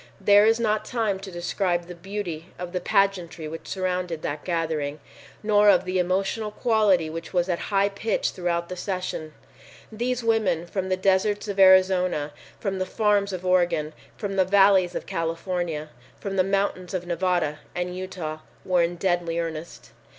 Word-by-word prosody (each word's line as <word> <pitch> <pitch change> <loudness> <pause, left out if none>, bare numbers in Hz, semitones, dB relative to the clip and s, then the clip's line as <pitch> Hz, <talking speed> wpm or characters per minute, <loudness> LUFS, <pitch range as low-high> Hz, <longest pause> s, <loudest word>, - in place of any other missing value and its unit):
There 205 +1 +6
is 225 +1 +3
not 215 -2 +1
time 220 -6 -1
to 195 0 -8
describe 175 0 -1
the 180 - -8
beauty 175 -2 -5
of 180 0 -6
the 180 - -1
pageantry 180 -4 0
which 165 +1 -8
surrounded 180 -3 -2
that 145 0 -3
gathering, 160 -4 -2 0.4
nor 210 -1 +5
of 190 -3 +4
the 185 0 0
emotional 195 +4 0
quality 210 -6 +2
which 165 +3 -7
was 175 -1 +2
at 175 -2 -1
high 200 0 +3
pitch 205 +2 -1
throughout 170 -1 -2
the 185 - -6
sessions. 180 -4 -4 0.6
These 240 +2 -2
women 220 -7 +1
from 190 +1 -3
the 185 - +1
deserts 195 +3 +1
of 200 -1 -4
Arizona, 185 -5 +5 0.3
from 195 -2 -2
the 185 - -1
farms 205 -1 +1
of 185 -1 -5
Oregon, 175 -4 +2 0.2
from 200 -3 -4
the 190 - +5
valleys 195 -1 +4
of - - -4
California, 165 -2 -3 0.3
from 195 -1 -4
the 185 - +4
mountains 195 -1 -1
of 180 -1 -3
Nevada 175 -3 0 0.2
and 180 0 -3
Utah, 180 -4 -5 0.3
were 180 -1 +3
in 170 +1 0
deadly 175 -2 0
earnest. 165 -1 -5
185 Hz, 165 wpm, -25 LUFS, 170-200 Hz, 0.6 s, There